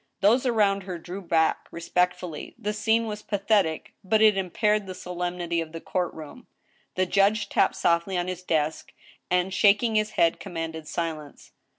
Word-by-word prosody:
Those 235 +6 +4
around 205 -4 +2
her 185 -2 -6
drew 180 +4 -7
back 165 -3 +1
respectfully. 180 -1 -2
The 210 +1 -3
scene 220 +2 +1
was 210 -1 -5
pa 205 - -2
thetic, 195 -6 +1
but 215 +3 +2
it 215 -1 +6
impaired 205 +2 0
the 185 - -6
solemnity 175 -1 -3
of 160 -1 -8
the 165 - -5
court 180 +1 -2
room. 160 +11 -11 0.5
The 185 - +2
judge 200 +2 +2
tapped - - +2
softly 170 +2 +1
on 175 0 -1
his 185 -1 -4
desk, 160 -3 -1 0.4
and, 180 +1 +1
shaking 205 +4 +4
his 215 0 +1
head, 165 -1 +3
com 175 - -9
manded 160 -1 -4
silence. 155 -4 -5
185 Hz, 175 wpm, -26 LUFS, 170-210 Hz, 0.5 s, it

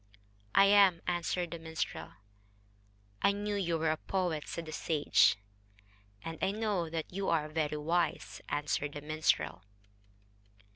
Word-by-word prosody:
"I 195 - +8
am," 195 -4 +5
answered 175 0 -1
the 170 - -5
minstrel. 160 -1 -4 1.1
"I 200 - +4
knew 205 +1 -3
you 175 -5 0
were 160 0 +1
a 155 - -1
poet," 175 -4 -2
said 170 - -5
the 155 - -7
sage. 145 -9 +3 0.9
"And 165 -1 -6
I - - +2
know 205 -5 -1
that 165 +1 -4
you 195 +1 -1
are 155 -2 +1
very 155 -1 -1
wise," 170 +4 -1
answered 145 0 -1
the 145 - -6
minstrel. 145 - 0
165 Hz, 140 wpm, -32 LUFS, 155-185 Hz, 1.1 s, I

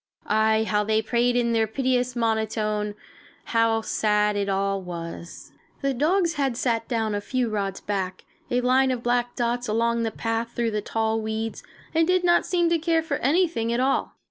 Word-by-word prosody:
Aye, 220 0 +3
how 210 -1 +1
they 220 +1 +2
prayed 240 +2 +1
in 235 -1 +2
their 225 -1 +2
piteous 250 +1 0
monotone! 215 -2 -1 0.5
How 230 -1 +2
sad 210 -1 +1
it 200 -1 -1
all 195 0 0
was! 170 -1 -8 0.3
The 275 0 +1
dogs 335 +6 +2
had 275 -6 -1
sat 230 -3 0
down 225 -3 -1
a 205 - -1
few 250 +2 -1
rods 195 -2 -2
back, 190 -2 -3 0.3
a 245 0 +1
line 260 +2 +3
of 250 -2 -2
black 240 0 0
dots 240 0 -1
along 230 +2 +1
the 225 - 0
path 225 +1 -3
through 235 -1 0
the 210 -1 -1
tall 220 +1 -1
weeds, 220 +1 -3 0.3
and 325 0 +3
did 365 0 +2
not 345 -1 +3
seem 345 -1 +2
to 335 - +3
care 325 0 +1
for 320 - -2
anything 285 -6 +1
at 235 - 0
all. 265 +1 +1
230 Hz, 185 wpm, -25 LUFS, 215-255 Hz, 0.5 s, Aye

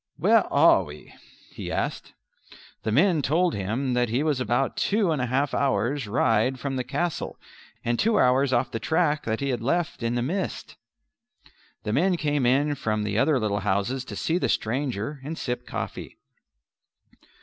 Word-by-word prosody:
"Where - - +3
are - - +5
we?" 75 +1 -12 0.4
he - - -6
asked. - - -3 0.7
The 110 +1 -2
men 160 - +3
told 165 +6 +2
him 115 +7 -2
that 125 -1 +1
he 125 +6 0
was 150 -4 +1
about 125 +1 0
two 200 -4 +1
and 150 -5 0
a 125 - 0
half 135 +4 0
hours' 130 0 0
ride 115 +3 +1
from 140 -2 -3
the 130 - -1
castle 170 +6 -3 0.5
and 120 0 0
two 225 +1 +3
hours 130 +2 +3
off 120 -1 +1
the 115 - -3
track 155 +3 +1
that 110 +2 -2
he 140 - -1
had 125 - -1
left 160 +6 -1
in 115 +1 -1
the 120 - 0
mist. 185 +9 -3 1.1
The 105 - -2
men 180 +6 +2
came 145 -5 0
in 145 +4 +2
from 110 -6 -2
the 105 +1 -1
other 145 +1 +3
little 105 -2 0
houses 100 +6 -1
to - - -7
see 170 +2 0
the - - 0
stranger 130 +2 -2
and 160 +4 -5
sip 125 -1 -4
coffee. - - -6
130 Hz, 175 wpm, -25 LUFS, 115-150 Hz, 1.1 s, are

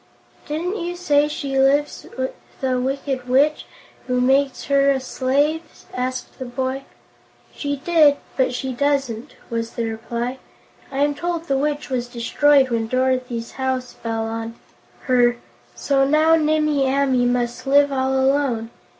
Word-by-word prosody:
"Didn't 345 +7 -2
you 350 -1 -4
say 295 -5 +2
she 280 -3 -2
lives 285 +2 +2
with 260 0 -2 0.3
a 255 -1 +1
Wicked 265 -1 -3
Witch, 285 +4 +2 0.4
who 250 -1 +1
makes 270 +1 +2
her 280 0 +3
a 275 -1 +2
slave?" 280 +5 0 0.3
asked 255 +2 -4
the 260 - -4
boy. 260 +2 -3 0.7
"She 285 -1 -2
did, 300 0 +4 0.2
but 260 -1 +2
she 260 +1 -3
doesn't," 275 -2 -1 0.2
was 230 0 -3
the 235 - -2
reply. 235 +3 -4 0.5
"I 275 +1 +1
am 290 0 +2
told 340 +2 -3
the 275 -4 -1
Witch 290 +1 -1
was 245 -2 -1
destroyed 265 +3 +3
when 225 -1 0
Dorothy's 255 -1 -1
house 260 -1 -2
fell 225 -1 -3
on 225 0 -5 0.5
her, 245 -2 +3 0.4
so 275 -1 +1
now 305 +3 +4
Nimmie 305 -3 +2
Amee 265 -3 +2
must 245 +1 -1
live 285 +1 +5
all 265 0 0
alone. 265 -4 +1
265 Hz, 145 wpm, -21 LUFS, 250-285 Hz, 0.7 s, live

